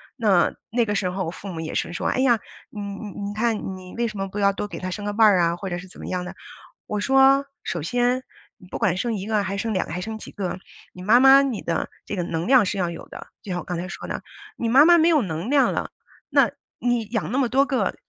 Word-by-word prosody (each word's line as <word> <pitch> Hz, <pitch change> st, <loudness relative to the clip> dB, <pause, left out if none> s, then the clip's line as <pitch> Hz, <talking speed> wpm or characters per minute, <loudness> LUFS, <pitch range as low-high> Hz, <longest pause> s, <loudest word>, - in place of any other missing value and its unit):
那 205 Hz, -8 st, +3 dB, 0.2 s
那 235 Hz, 0 st, +2 dB
个 205 Hz, -, -1 dB
时 190 Hz, -2 st, 0 dB
候 190 Hz, 0 st, -2 dB
我 -, -, -3 dB
父 195 Hz, -, -10 dB
母 165 Hz, -3 st, -5 dB
也 160 Hz, -, -5 dB
是 175 Hz, -, -1 dB
说： -, -, -2 dB
“哎 -, -, -1 dB
呀， 245 Hz, -4 st, +4 dB, 0.3 s
你 210 Hz, -, -8 dB
你 200 Hz, +1 st, -6 dB
你 200 Hz, +1 st, -5 dB
看 215 Hz, -4 st, -1 dB
你 185 Hz, -1 st, -11 dB
为 235 Hz, 0 st, 0 dB
什 215 Hz, -2 st, -7 dB
么 195 Hz, 0 st, -2 dB
不 195 Hz, +2 st, -6 dB
要 200 Hz, -1 st, +4 dB
多 205 Hz, -, -4 dB
给 170 Hz, -5 st, -7 dB
他 185 Hz, -, -4 dB
生 205 Hz, +2 st, -5 dB
个 205 Hz, -, -2 dB
伴 220 Hz, +1 st, +6 dB
儿 200 Hz, -3 st, +5 dB
啊？” 170 Hz, 0 st, +2 dB
或 195 Hz, +2 st, -5 dB
者 175 Hz, -, -3 dB
是 180 Hz, +1 st, -9 dB
怎 -, -, -15 dB
么 -, -, -7 dB
样 180 Hz, -1 st, -2 dB
的。 -, -, -8 dB, 0.5 s
我 210 Hz, -, -2 dB
说： 270 Hz, +3 st, +5 dB, 0.2 s
“首 170 Hz, -, -3 dB
先 245 Hz, +7 st, +1 dB, 0.3 s
你 180 Hz, -, -16 dB
不 -, -, -5 dB
管 185 Hz, -5 st, +1 dB
生 240 Hz, +1 st, -1 dB
1 195 Hz, -1 st, -4 dB
个， 215 Hz, -2 st, +1 dB
还 195 Hz, -, -3 dB
是 -, -, -1 dB
生 225 Hz, -2 st, -1 dB
2 185 Hz, -, 0 dB
个， -, -, -6 dB
还 180 Hz, -, -3 dB
是 -, -, -5 dB
生 220 Hz, 0 st, -5 dB
几 -, -, -10 dB
个， 185 Hz, -2 st, -4 dB, 0.3 s
你 180 Hz, -, -11 dB
妈 220 Hz, +5 st, +6 dB
妈 270 Hz, +1 st, +8 dB
你 255 Hz, -7 st, -2 dB
的 170 Hz, -, -2 dB, 0.2 s
这 -, -, -4 dB
个 180 Hz, -, -1 dB
能 165 Hz, +1 st, -3 dB
量 255 Hz, -4 st, +6 dB
是 200 Hz, -, -2 dB
要 175 Hz, -2 st, 0 dB
有 170 Hz, -, -8 dB
的。” -, -, -10 dB, 0.2 s
就 195 Hz, -, -6 dB
像 180 Hz, -, -1 dB
我 -, -, -6 dB
刚 175 Hz, -2 st, -4 dB
才 180 Hz, +2 st, -4 dB
说 -, -, -7 dB
的， -, -, -5 dB, 0.3 s
你 230 Hz, -, -1 dB
妈 270 Hz, +6 st, +7 dB
妈 345 Hz, 0 st, +7 dB
没 325 Hz, -, +4 dB
有 320 Hz, -4 st, +4 dB
能 170 Hz, +2 st, -4 dB
量 285 Hz, -2 st, +4 dB
了， -, -, -3 dB, 0.4 s
那 -, -, +4 dB, 0.3 s
你 240 Hz, -1 st, +1 dB
养 220 Hz, -1 st, -3 dB
那 255 Hz, -, 0 dB
么 265 Hz, -3 st, +2 dB
多 270 Hz, +2 st, +3 dB
个， 250 Hz, -8 st, 0 dB
205 Hz, 300 characters per minute, -23 LUFS, 185-240 Hz, 0.5 s, 妈